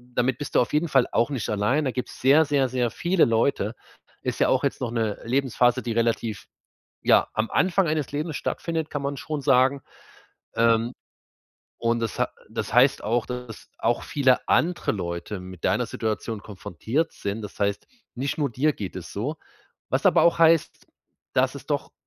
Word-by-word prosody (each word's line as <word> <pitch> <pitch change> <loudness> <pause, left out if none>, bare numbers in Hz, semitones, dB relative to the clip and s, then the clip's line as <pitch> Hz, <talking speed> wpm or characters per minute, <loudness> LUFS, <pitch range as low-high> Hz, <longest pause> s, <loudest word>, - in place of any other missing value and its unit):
damit 125 0 +1
bist 145 - -6
du - - +6
auf 125 - 0
jeden 155 +3 +2
Fall 135 -4 +3
auch 120 +3 +2
nicht 125 -6 -3
alleine. 110 +9 +1
Da 130 - 0
gibt's 125 0 -5
sehr, 145 +5 +6
sehr, 140 -3 +1
sehr 125 -2 0
viele 175 0 +2
Leute. 115 -1 +1 0.5
Ist - - -3
ja - - +3
auch - - +2
jetzt - - -1
noch 120 - -2
'ne 110 -3 -1
Lebensphase, 125 -1 +2
die 120 - -4
relativ, 115 -2 -1 0.6
ja, - - +4
am 110 +1 -1
Anfang 185 -1 +2
eines 155 -2 -1
Lebens 150 +2 -3
stattfindet, 160 -1 -3
kann 145 - -3
man 140 0 -2
schon 150 +1 -4
sagen. 135 0 +3 0.7
Ähm, 115 +1 +3 0.9
und 115 0 0
das 115 -3 -3
ha - - +1 0.2
das - - -4
heißt - - +4
auch, 115 +3 0
dass 125 -3 -7
auch 120 +1 0
viele 135 -4 +1
andere 175 +1 +2
Leute 90 +1 -4
mit 90 -2 -11
deiner - - +2
Situation 110 -1 -3
konfrontiert 110 - -3
sind. 100 +2 -4
Das 105 - -9
heißt, 100 0 0 0.3
nicht 135 +5 -3
nur 145 -4 0
dir 145 +6 +1
geht 95 -8 -6
es 90 - -8
so, 130 +10 -3 0.5
was - - +1
aber - - +5
auch 170 - +4
heißt, 165 -1 +3 0.5
dass - - +2
es - - -10
doch - - -2
125 Hz, 180 wpm, -25 LUFS, 110-145 Hz, 0.9 s, du